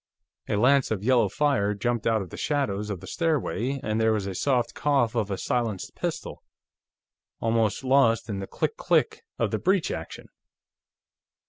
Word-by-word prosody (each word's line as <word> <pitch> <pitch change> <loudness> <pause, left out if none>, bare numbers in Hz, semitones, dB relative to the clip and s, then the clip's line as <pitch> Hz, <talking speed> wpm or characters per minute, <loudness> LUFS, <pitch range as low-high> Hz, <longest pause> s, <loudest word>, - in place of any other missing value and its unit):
A - - +1
lance 130 +5 +4
of 105 -3 -2
yellow 120 -3 +3
fire 115 -6 +1
jumped 120 +2 -1
out 110 -3 +2
of 90 - -12
the - - -7
shadows 105 -9 -1
of 95 -5 -4
the - - -9
stairway, 140 - -1
and 110 +1 0
there 110 0 +3
was 105 -3 -1
a 100 - -4
soft 120 +4 0
cough 135 -6 +1
of 110 -4 -1
a 100 - -2
silenced 115 -6 -2
pistol, - - -4 1.0
almost 115 0 +1
lost 130 -4 +3
in 100 -3 -3
the 95 - -5
click - - -2
click - - +1
of - - 0
the - - -1
breech 190 -2 +1
action. 80 - -7
115 Hz, 170 wpm, -26 LUFS, 105-135 Hz, 1.0 s, lance